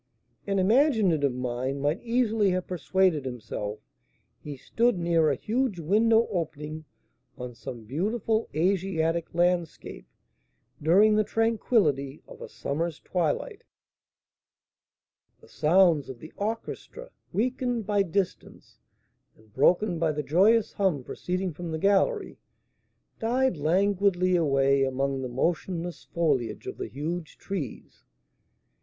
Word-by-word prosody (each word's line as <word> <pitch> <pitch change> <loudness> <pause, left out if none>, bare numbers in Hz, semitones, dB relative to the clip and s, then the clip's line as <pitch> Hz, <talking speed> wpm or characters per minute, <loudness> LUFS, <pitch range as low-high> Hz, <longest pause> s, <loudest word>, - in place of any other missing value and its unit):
An 195 0 0
imaginative 195 - +3
mind 125 +2 -3
might 145 +7 0
easily 230 -4 +1
have 185 -1 -1
persuaded 180 -3 +1
himself 110 -4 -5 0.6
he 145 -2 -8
stood 235 - +1
near 170 -2 +2
a 140 - +1
huge 230 - -1
window 220 +7 +3
opening 155 -3 -4 0.5
on 125 -1 -7
some 115 0 -8
beautiful 215 - -1
Asiatic 170 -2 0
landscape 175 -1 -1 0.7
during 195 +8 +5
the 215 - +3
tranquillity 210 - +1
of - - -13
a - - -8
summer's 160 +3 -3
twilight. 185 - -2 1.8
The - - -19
sounds 160 -3 +3
of 130 - -7
the 155 +6 -12
orchestra, 225 - -5 0.2
weakened 245 0 -1
by 205 0 +2
distance, 190 0 -4 0.6
and 110 -1 -24
broken 175 - +2
by 160 -2 +1
the 150 0 -3
joyous 200 +9 +3
hum 185 -9 0
proceeding 180 +5 -3
from 170 +2 -6
the 160 - -2
gallery, 200 - +1 0.8
died 250 0 +1
languidly 185 +3 +2
away 140 -4 +3
among 135 0 -1
the 130 - -4
motionless 170 +6 -2
foliage 135 -10 -1
of - - -6
the - - -3
huge 160 +4 -5
trees. 175 - -6
175 Hz, 115 wpm, -27 LUFS, 145-205 Hz, 1.8 s, during